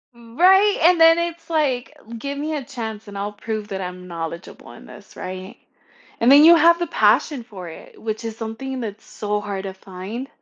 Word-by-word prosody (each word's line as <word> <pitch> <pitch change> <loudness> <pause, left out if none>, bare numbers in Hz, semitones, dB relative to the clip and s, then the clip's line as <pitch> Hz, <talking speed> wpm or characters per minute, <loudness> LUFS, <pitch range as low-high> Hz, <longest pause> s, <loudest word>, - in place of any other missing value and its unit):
Mm 235 0 -16
Right? 385 +3 +5
And 345 0 +5
then 330 0 +7
it's 340 0 -4
like, 275 -6 -1 0.2
"Give 280 +3 -5
me 305 +2 -3
a 285 - -4
chance, 225 -5 -7
and 200 -1 -8
I'll 205 +1 -3
prove 215 0 -5
that 195 -1 -4
I'm 180 0 -7
knowledgeable 170 0 -7
in - - -14
this," - - -14
right? 185 +2 -7 0.6
And 240 +3 +5
then 285 +2 +9
you 335 +1 +9
have 340 +2 +5
the 345 - -1
passion 285 -7 +2
for 190 -6 -10
it, 160 - -13
which 220 +1 -4
is 225 -1 -4
something 245 +4 -5
that's 215 -1 -7
so 210 0 -3
hard 200 -1 -5
to 190 -1 -6
find. 195 +7 -8
230 Hz, 200 wpm, -21 LUFS, 200-300 Hz, 0.6 s, then